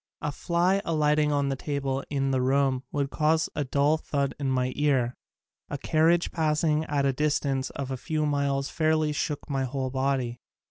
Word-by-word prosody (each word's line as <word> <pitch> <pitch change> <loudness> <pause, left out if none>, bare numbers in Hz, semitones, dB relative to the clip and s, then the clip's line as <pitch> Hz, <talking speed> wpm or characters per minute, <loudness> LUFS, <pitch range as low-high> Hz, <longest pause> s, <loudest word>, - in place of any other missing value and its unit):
A 150 - -1
fly 175 +6 +1
alighting 150 -2 +2
on 140 -1 +1
a - - 0
table 135 -1 -2
in 135 -1 0
the 130 -1 +1
room 135 0 +2
would 140 -1 -1
cause 160 +2 +2
a 145 - 0
dull 140 +3 +2
thud 140 -3 -2
in 140 -2 -1
my 130 -1 0
ear. 135 -5 +1 0.5
A - - -3
carriage 165 +2 +2
passing 155 -1 +1
at 140 -2 0
a 135 - +2
distance 140 -2 0
of 135 -1 -5
a 130 - -2
few 155 +4 -1
miles 140 -1 0
fairly 155 -1 +1
shook 150 0 -3
my 135 -2 -1
whole 130 0 -3
body. 130 -2 -1
140 Hz, 180 wpm, -27 LUFS, 135-155 Hz, 0.5 s, alighting